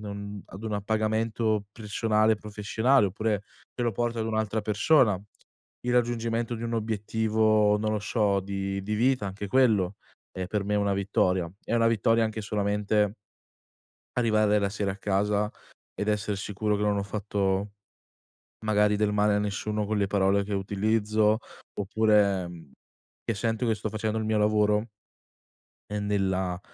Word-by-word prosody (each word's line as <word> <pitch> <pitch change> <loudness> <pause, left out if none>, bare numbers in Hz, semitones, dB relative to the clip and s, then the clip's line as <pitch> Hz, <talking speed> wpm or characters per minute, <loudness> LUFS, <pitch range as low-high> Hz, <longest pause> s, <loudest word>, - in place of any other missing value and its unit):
non 100 -1 -7
ad 95 +3 -10
un 110 - -3
appagamento 110 +1 0
personale 110 0 +1
professionale, 105 +3 +1
oppure 105 +1 -1 0.3
te 125 - -3
lo 120 - +1
porto 120 +2 -1
ad 110 - -1
un'altra 110 -1 -1
persona. 105 -1 +3 0.6
Il 125 - -1
raggiungimento 120 -1 0
di 115 - -6
un 115 0 -2
obiettivo, 110 -1 +2
non 110 0 -1
lo 105 - 0
so, 105 -2 +1
di 100 0 -3
di 105 +2 -2
vita 125 0 +2
anche 100 +1 -5
quello 105 -6 +3 0.4
è 95 -1 -4
per 100 +2 -2
me 105 +1 -1
una 100 -1 +1
vittoria, 95 -3 +1
è - - -1
una 115 -1 +3
vittoria 115 +1 +2
anche 110 0 -3
solamente 105 0 0 1.0
arrivare 110 -3 +3
la 100 - +1
sera 100 -1 -2
a 95 - -8
casa 105 +2 0 0.4
ed 105 +1 -2
esser 105 -1 -1
sicuro 105 +1 -1
che 105 - -3
non 105 -1 +1
ho 100 - -1
fatto 100 -1 -1 0.9
magari 105 -1 +3
del 105 -1 +1
male 105 0 +3
a - - +2
nessuno 105 +1 -2
con 105 0 -1
le 100 - +1
parole 100 0 +2
che 100 +1 -5
utilizzo, 105 +2 +1 0.4
oppure, 105 -2 +2
mhmm, 80 -5 -12 0.5
che - - -1
sento 115 +3 -1
che 115 - +2
sto 105 +1 -4
facendo 110 +1 -2
il 110 - -2
mio 110 0 +1
lavoro 105 +1 +2 1.0
ehm, 105 0 -2
nella 95 -3 0
105 Hz, 155 wpm, -27 LUFS, 100-110 Hz, 1.0 s, persona